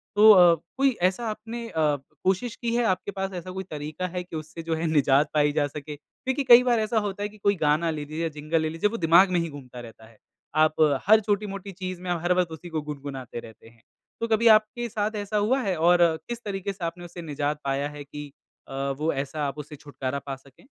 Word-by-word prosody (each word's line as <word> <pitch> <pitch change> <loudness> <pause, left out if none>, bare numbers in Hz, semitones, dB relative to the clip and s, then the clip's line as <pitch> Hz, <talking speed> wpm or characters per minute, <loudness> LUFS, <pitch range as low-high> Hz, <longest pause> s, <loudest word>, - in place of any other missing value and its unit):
तो 215 +1 +8
अ, 175 -4 +7 0.2
कोई 275 0 +4 0.2
ऐसा 230 +5 -6
आपने 225 +2 -6
अ, 155 -4 +1 0.3
कोशिश 195 +5 0
की 235 -2 -3
है 240 - +2
आपके 185 +2 -6
पास 195 0 -2
ऐसा 185 - -8
कोई 190 +1 -5
तरीका 150 +4 -4
है 180 - -2
कि 180 - -10
उससे 160 +1 -7
जो 165 0 -1
है 160 +1 -2
निजात 145 -1 +3
पाई 150 -1 +3
जा 145 - +2
सके? 150 +1 -8
देखिए 260 - -4
कई 240 +1 +10
बार 240 -2 +2
ऐसा 220 +1 0
होता 205 +1 -6
है 205 - -2
कि 215 - -17
कोई 200 0 +2
गाना 155 +3 +2
ले 150 -2 -5
लीजिए, 160 +3 -3
जिंगल 155 +2 -1
ले 160 - -1
लीजिए 165 +6 0
वो 230 - -4
दिमाग 180 +4 +7
में 180 - +2
ही 170 0 -2
घूमता 130 -4 -10
रहता 115 -2 -12
है, 115 -1 -21 0.4
आप 155 0 +3 0.3
हर 220 +1 +8
छोटी-मोटी 200 -1 -2
चीज़ 185 -1 -6
में 180 - -6
हर 175 +1 +1
वक़्त 180 -2 +1
उसी 160 +2 -9
को 160 -2 -2
गुनगुनाते 140 -4 -7
रहते 110 -1 -13
हैं। 115 0 -25 0.4
तो 230 - 0
कभी 225 +1 +3
आपके 220 +2 +4
साथ 215 0 -2
ऐसा 205 +1 -2
हुआ 235 +6 +2
है? 195 -6 -1
और 175 +2 +5 0.3
किस 240 0 -5
तरीके 200 -1 -3
से 190 - -10
आपने 175 +1 -5
उसे 175 0 -9
निजात 150 -1 -2
पाया 140 +1 -1
है 150 -1 -9
कि 145 0 -9 0.4
अ, - - -10 0.2
वो 155 +3 0
ऐसा 140 +2 -3
आप 140 +1 -5
उससे 150 0 -8
छुटकारा 140 -1 -5
पा 135 - -3
सकें? 135 - -21
170 Hz, 235 wpm, -26 LUFS, 150-205 Hz, 0.4 s, कई